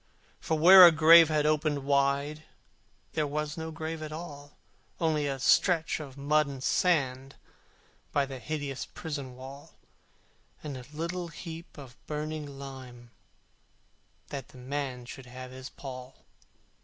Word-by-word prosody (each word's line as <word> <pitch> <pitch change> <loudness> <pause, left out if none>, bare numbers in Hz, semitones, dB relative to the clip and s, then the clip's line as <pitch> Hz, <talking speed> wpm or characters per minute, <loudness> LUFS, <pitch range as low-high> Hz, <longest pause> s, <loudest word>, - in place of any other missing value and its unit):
For 160 - -1
where 185 +4 +10
a - - +6
grave 165 +1 +8
had 150 -1 +1
opened 150 -2 +1
wide, 140 +2 +1 0.7
There 155 -2 0
was 150 +1 -3
no 160 0 -5
grave 160 0 -5
at 155 -1 -6
all: 145 -3 -9 0.4
Only 155 -3 +1
a 135 -1 -2
stretch 165 +5 +2
of 140 -3 -9
mud 150 +1 +2
and 135 -2 -7
sand 135 -7 +1 0.8
By 140 -1 +2
the 135 -1 -8
hideous 145 -1 -4
prison 140 -6 -7
wall, 135 +2 -11 0.9
And 150 -3 -5
a 125 -1 -9
little 170 +3 -4
heap 165 0 -9
of 130 -4 -13
burning 150 -2 -5
lime, 130 -3 -10 1.2
That 135 -2 -6
the - - -16
man 130 -1 -4
should 125 +1 -10
have 130 +1 -9
his 130 +1 -9
pall. 130 -1 -10
145 Hz, 140 wpm, -29 LUFS, 135-155 Hz, 1.2 s, where